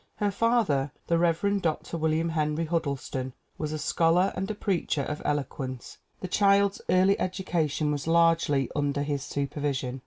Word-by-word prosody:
Her 205 -1 0
father, 200 - +1
the 170 -1 +1
Rev. 175 +4 +1
Dr. 165 0 -2
William 160 +1 0
Henry 155 0 0
Huddleston, 140 -5 -2 0.3
was 155 -1 -2
a 155 - -2
scholar 165 +4 +2
and 195 +2 -3
a 215 - -2
preacher 175 -8 -1
of 150 +2 -4
elo 145 -1 +1
quence. 130 -3 -7 0.2
The 185 - -3
child's 200 +1 +3
early 185 +2 +4
education 165 -5 -1
was 145 0 -3
largely 165 -5 +3
under 145 -1 0
his 145 -1 -2
supervision. 140 -2 -3
160 Hz, 155 wpm, -27 LUFS, 145-185 Hz, 0.3 s, early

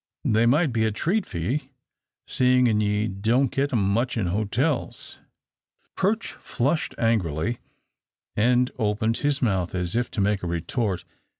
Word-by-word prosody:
They 110 +2 +3
might 145 +2 +3
be 110 -1 +1
a 110 - +1
treat 185 - 0
for 85 - -6
ye, 130 - -2 0.6
seein' 125 -4 +3
ye 105 +1 +1
don't 115 +7 +1
git 140 +1 0
'em 100 -5 +1
much 120 +3 0
in 105 - 0
hotels." 110 - -1 0.8
Perch 210 +4 0
flushed 140 +6 -1
angrily 110 -2 0 0.8
and 125 +3 +3
opened 110 +1 0
his 145 -2 0
mouth 95 -6 0
as 90 +2 -1
if 120 +1 0
to 115 - -5
make 100 0 +1
a 90 - -3
retort. 90 +3 -2
115 Hz, 145 wpm, -25 LUFS, 100-130 Hz, 0.8 s, They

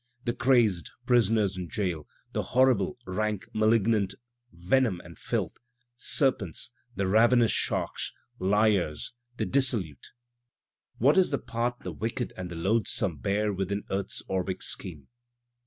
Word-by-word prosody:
The 120 -1 -1
crazed, 120 - +2 0.2
prisoners 110 -5 +3
in 90 -2 -5
jail, 90 -8 -2 0.3
the - - 0
horrible, 125 -6 +2
rank, 105 +2 -2
malignant. 110 -2 +2 0.4
Venom 95 +4 +1
and 85 -1 -12
filth, - - -2 0.4
serpents, 120 - +1 0.2
the 95 - 0
ravenous 115 +4 +4
sharks, - - -1 0.3
liars, 100 -4 +1 0.2
the - - -1
dissolute; 120 - 0 0.9
(What 145 +9 +5
is 185 - +3
the 140 - 0
part 120 0 -3
the - - -5
wicked 115 +2 -3
and 90 -1 -6
the 85 - -7
loathesome 100 0 +1
bear 100 - 0
within 100 +2 -2
earth's 95 +1 -2
orbic 95 0 -2
scheme?) 80 -8 -6
105 Hz, 125 wpm, -28 LUFS, 95-120 Hz, 0.9 s, What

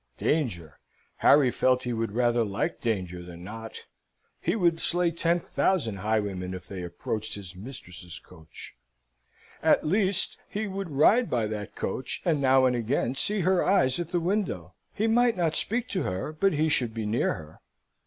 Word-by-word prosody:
Danger! 85 - -2 0.4
Harry 140 -3 +5
felt 130 +1 +2
he 125 - -2
would 115 -2 -2
rather 120 0 +2
like 100 -2 -3
danger 90 -6 -2
than 85 0 -11
not. 110 +3 -9 0.5
He 175 - -1
would 170 -5 +2
slay 175 0 +2
ten 170 +1 +1
thousand 150 - 0
highwaymen 100 -3 -2
if 90 -1 -9
they 95 -2 -6
approached 110 +5 -3
his 95 -3 -8
mistress's 90 -5 -8
coach. 80 -3 -12 0.9
At - - +3
least, 190 +3 +3
he 215 +1 -3
would 195 -2 -5
ride 205 - +4
by 120 -3 0
that 105 -1 -5
coach, 125 +7 -3
and 160 -5 +1
now 130 -1 +4
and 125 -1 +2
again 120 +1 -1
see 205 +9 +4
her 185 +1 +2
eyes 175 -8 +3
at 170 -2 -4
the 175 - 0
window. 195 +4 -2 0.2
He 215 - -2
might 235 0 +3
not 165 -3 +1
speak 235 +8 +2
to 185 - -1
her, 95 +11 -3
but 195 +4 +1
he 155 +1 +1
should 120 -7 +1
be 110 -1 -3
near 110 +3 0
her. 75 0 -12
130 Hz, 175 wpm, -27 LUFS, -, 0.9 s, Harry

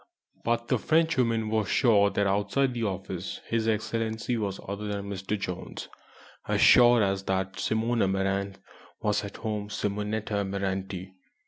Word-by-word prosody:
But 115 0 0
the 125 - +2
Frenchwoman 125 -9 +2
was 110 -1 0
sure 105 -5 +4
that 100 0 0
outside 105 +7 +1
the 115 -2 -2
office 95 -2 -4
HE 115 - +2 0.8
was 100 -3 -3
other 100 +2 -4
than 100 -1 -3
"Mr. 100 +2 -3
Jones," 90 -2 -6 0.6
as - - +1
sure 120 -2 +7
as 95 -1 0
that 95 0 -1
Simone 115 +2 0
Amaranthe 95 0 0 0.4
was 105 -2 0
at 100 - -7
home 105 -2 -3
Simonetta 105 +1 -2
Amaranti. 95 -1 -3
105 Hz, 135 wpm, -28 LUFS, 95-110 Hz, 0.8 s, sure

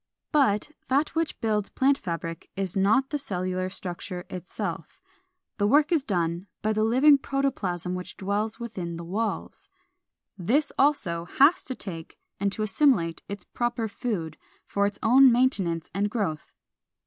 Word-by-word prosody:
454. 285 -5 +5 0.3
But - - -40
that 280 +4 +2
which 325 0 -1
builds 210 -2 0
plant 275 +1 +3
fabric 165 -5 -5
is 195 -2 -2
not 215 +8 +3
the 295 - -1
cellular 185 -5 -2
structure 180 -2 -6
itself; 180 +1 -5 0.6
the 205 - +3
work 295 +8 +4
is 330 -4 +3
done 175 -5 -1 0.2
by 215 0 +2
the 215 0 +1
living 270 +6 +6
protoplasm 195 -12 -1
which 180 0 -6
dwells 210 +3 -2
within 185 -8 -5
the 170 - -6
walls. 210 +7 -3 0.7
This 270 - +1
also 180 - +1
has 280 - +4
to 260 - -3
take 165 -8 -8 0.2
and 200 0 +1
to 215 - -3
assimilate 205 - +2
its 200 -2 -6
proper 240 -1 -2
food, 200 - -4 0.3
for 200 0 +1
its 205 0 -4
own 255 +3 +7
maintenance 195 -10 +1
and 200 +3 0
growth. 195 -9 -3
205 Hz, 150 wpm, -26 LUFS, 180-260 Hz, 0.7 s, own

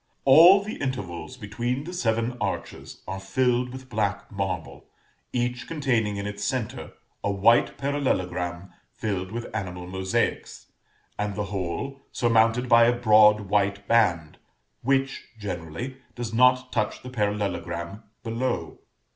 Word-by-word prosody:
All 170 +9 +8
the 215 - -6
intervals 130 -4 -4
between 120 +4 -3
the 175 +4 -7
seven 115 -5 0
arches - - -5
are 95 - -4
filled 125 +5 +1
with 130 0 -9
black 105 -4 -2
marble, 95 -3 -4 0.4
each 120 0 -2
containing 120 -10 0
in 100 - -4
its 105 0 -5
centre 120 +1 -3 0.3
a - - 0
white 105 +4 +3
parallelogram 90 -10 -2 0.2
filled 95 -3 -3
with 120 +1 -6
animal 90 -2 -4
mosaics, 95 +1 -2 0.5
and 105 -1 -2
the 105 - -1
whole 100 +9 -3
surmounted 115 +1 +2
by 115 -1 +7
a 120 +1 +2
broad 105 -2 +6
white 100 0 0
band, 90 -10 +2 0.4
which, 135 +1 0
generally, 100 - -5 0.2
does 120 -2 -5
not 125 +1 +4
touch 110 -2 -1
the 125 - -7
parallelogram 100 -4 -2 0.2
below. 120 +2 -3
110 Hz, 130 wpm, -25 LUFS, 100-125 Hz, 0.5 s, All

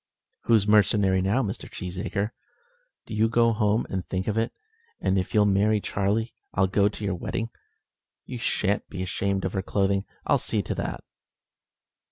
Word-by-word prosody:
"Who's 110 -3 +4
mercenary 100 -2 +4
now, 105 +8 +2
Mr. 100 -2 -5
Cheesacre? 100 +3 -3 0.7
Do - - -8
you 110 +1 +3
go 115 0 +4
home 105 +1 +2
and 95 -2 -3
think 95 0 -2
of 105 - 0
it; 115 +1 +1 0.5
and 95 - +1
if 95 +1 -1
you'll 105 -1 +6
marry 105 +2 +3
Charlie, 105 +4 -1 0.2
I'll 95 - +4
go 100 +2 +3
to 105 0 -6
your 100 - 0
wedding. 115 +6 -3 0.7
You 125 - -6
shan't 100 -2 0
be 95 -2 -4
ashamed 95 +1 -1
of 95 - -2
her 95 - 0
clothing. 100 0 +1 0.2
I'll - - +3
see - - -1
to - - -2
that." - - -4
100 Hz, 170 wpm, -26 LUFS, 95-110 Hz, 0.7 s, you'll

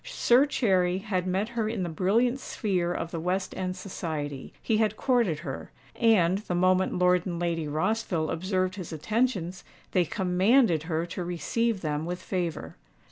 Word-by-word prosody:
Sir 280 - +3
Cherry 185 -9 +2
had 190 -2 -2
met 190 +4 0
her 230 -2 -1
in 220 -4 -2
the - - -2
brilliant 220 - +1
sphere 185 -8 -1
of 165 -1 -3
the 165 - -3
West 180 +3 -1
End 185 -1 -3
society: 155 -7 -5
he 220 - 0
had 215 -1 +1
courted 235 - +1
her; 135 -5 -6 0.3
and, 195 -6 +3
the 195 -4 -4
moment 185 +1 +2
Lord 180 0 +3
and 170 -2 -3
Lady 165 -3 -1
Rossville 160 +1 -1
observed 185 +2 -1
his 180 -3 -6
attentions, 185 - -1 0.3
they 180 -2 +3
commanded 185 - +3
her 160 0 0
to 175 +1 -5
receive 195 +5 -1
them 150 0 -2
with 180 +1 -3
favour. 180 -3 -4
185 Hz, 165 wpm, -27 LUFS, 170-215 Hz, 0.3 s, Sir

